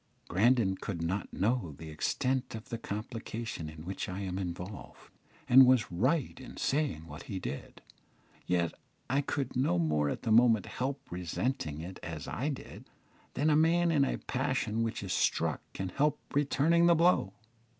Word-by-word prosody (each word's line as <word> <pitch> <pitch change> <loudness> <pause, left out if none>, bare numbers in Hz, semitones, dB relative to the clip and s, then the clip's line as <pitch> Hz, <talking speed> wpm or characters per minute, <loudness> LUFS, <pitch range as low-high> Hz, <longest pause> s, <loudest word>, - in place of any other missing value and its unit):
Grandon 105 0 +3
could 85 -6 -4
not 95 +4 -2
know 105 - 0
the 80 -1 -8
extent 130 - -1
of 110 - -9
the 115 - -4
complication 110 -5 -5
in 80 +1 -10
which 95 +1 -4
I 95 +2 -4
am 95 -1 -3
involved, 90 +2 -7 0.4
and 130 +1 +9
was 125 -6 +3
right 130 - 0
in 130 - -10
saying 135 - 0
what 75 +1 -10
he 95 - -3
did; 70 -6 -6 0.6
yet 85 -2 +1 0.4
I 135 +1 +3
could 140 -2 -3
no 125 -9 +2
more 75 -3 +1
at - - -4
the 115 - 0
moment 115 -3 +5
help 135 +2 -4
resenting 90 - -2
it 90 +3 -8
as 80 -3 -6
I 140 +5 -2
did, 140 - -7 0.5
than 150 +3 +2
a - - +5
man 170 +2 +4
in 145 -4 +4
a 135 - 0
passion 110 +1 -1
who 115 - +2
is 100 -4 -4
struck - - +1
can 95 - -4
help 145 +9 +1 0.2
returning 155 +4 +3
the 170 - +6
blow. 165 - +3
110 Hz, 170 wpm, -31 LUFS, 90-135 Hz, 0.6 s, and